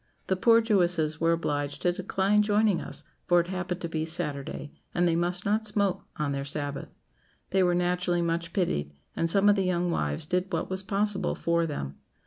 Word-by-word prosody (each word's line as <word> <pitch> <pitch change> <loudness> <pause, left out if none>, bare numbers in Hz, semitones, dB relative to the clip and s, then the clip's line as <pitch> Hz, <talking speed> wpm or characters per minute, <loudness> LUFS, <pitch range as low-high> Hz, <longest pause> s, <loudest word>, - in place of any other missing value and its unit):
The 190 - +1
poor 230 +4 +5
Jewesses 175 -8 +1
were 165 0 +3
obliged 145 -3 -2
to 180 - +3
decline 195 +3 +1
joining 210 -2 +2
us, - - -6 0.2
for 175 0 +5
it 170 +1 -1
happened 185 -1 -3
to 170 - -2
be 160 -1 -2
Saturday, 150 -3 -4 0.2
and 175 0 +3
they 165 - +2
must 175 +2 0
not 215 +2 +1
smoke 200 -3 0
on 150 -2 -1
their 140 0 -2
Sabbath. 145 -1 -4 0.6
They 190 - +3
were 175 -1 +3
naturally 175 0 +1
much 170 0 -2
pitied, 75 - -1 0.2
and 165 - +1
some 195 +3 +4
of 205 - +6
the 195 - +1
young 180 -1 0
wives 75 - -1
did 180 +3 -1
what - - -2
was 185 0 -1
possible 200 0 0
for 170 0 0
them. 70 - -5
175 Hz, 195 wpm, -27 LUFS, 160-190 Hz, 0.6 s, of